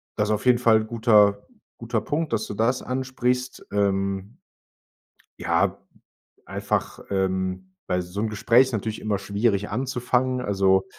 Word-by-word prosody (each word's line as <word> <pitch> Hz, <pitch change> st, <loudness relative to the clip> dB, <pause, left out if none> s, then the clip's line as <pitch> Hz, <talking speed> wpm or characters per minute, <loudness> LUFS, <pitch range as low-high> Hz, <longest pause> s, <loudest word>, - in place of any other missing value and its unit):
das 105 Hz, 0 st, 0 dB
auf 105 Hz, +2 st, -1 dB
jeden 125 Hz, -1 st, +5 dB
Fall 115 Hz, -3 st, +5 dB
'n -, -, -5 dB
guter 105 Hz, -3 st, +4 dB, 0.3 s
guter 115 Hz, -1 st, -2 dB
Punkt, 150 Hz, +8 st, -2 dB
dass 110 Hz, -, -1 dB
du -, -, -5 dB
das 115 Hz, +5 st, +1 dB
ansprichst, 125 Hz, -1 st, -2 dB
ähm 100 Hz, +2 st, -1 dB, 1.0 s
ja, -, -, +1 dB, 0.7 s
einfach, -, -, -2 dB
ähm, 95 Hz, -1 st, -1 dB
weil 90 Hz, 0 st, 0 dB
so 90 Hz, +3 st, -6 dB
'n 110 Hz, -, 0 dB
Gespräch 115 Hz, +3 st, +4 dB
ist 130 Hz, -, -6 dB
natürlich 110 Hz, 0 st, -3 dB
immer 105 Hz, -2 st, -1 dB
schwierig 100 Hz, +1 st, 0 dB
anzufangen, 125 Hz, +1 st, 0 dB
also 95 Hz, -4 st, +2 dB
110 Hz, 140 wpm, -24 LUFS, 100-125 Hz, 1.0 s, jeden